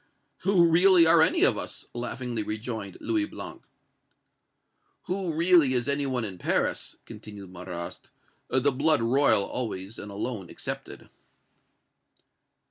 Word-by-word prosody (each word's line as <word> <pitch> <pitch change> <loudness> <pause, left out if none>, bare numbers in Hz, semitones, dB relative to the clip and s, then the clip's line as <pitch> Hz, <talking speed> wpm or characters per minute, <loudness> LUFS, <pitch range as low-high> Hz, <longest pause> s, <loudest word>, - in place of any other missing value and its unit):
"Who 185 -4 +4
really 175 +1 +6
are 165 0 +6
any 160 - +3
of - - +4
us?" - - -5
laughingly 120 -1 -4
rejoined 110 -2 -5
Louis 320 -2 0
Blanc. - - -9 1.4
"Who 185 -1 -2
really 165 -4 +4
is 120 -1 0
any 140 0 0
one 125 -3 -1
in 95 -4 -7
Paris," - - -1
continued 100 -3 -11
Marrast, 90 -1 -8 0.4
"the 130 +2 +2
blood 145 -1 +2
royal 115 -4 +4
always 105 -3 -4
and 105 - -8
alone 100 -3 -5
excepted?" - - -7
"Of - - -18
M. - - -26
125 Hz, 130 wpm, -27 LUFS, 105-160 Hz, 1.4 s, really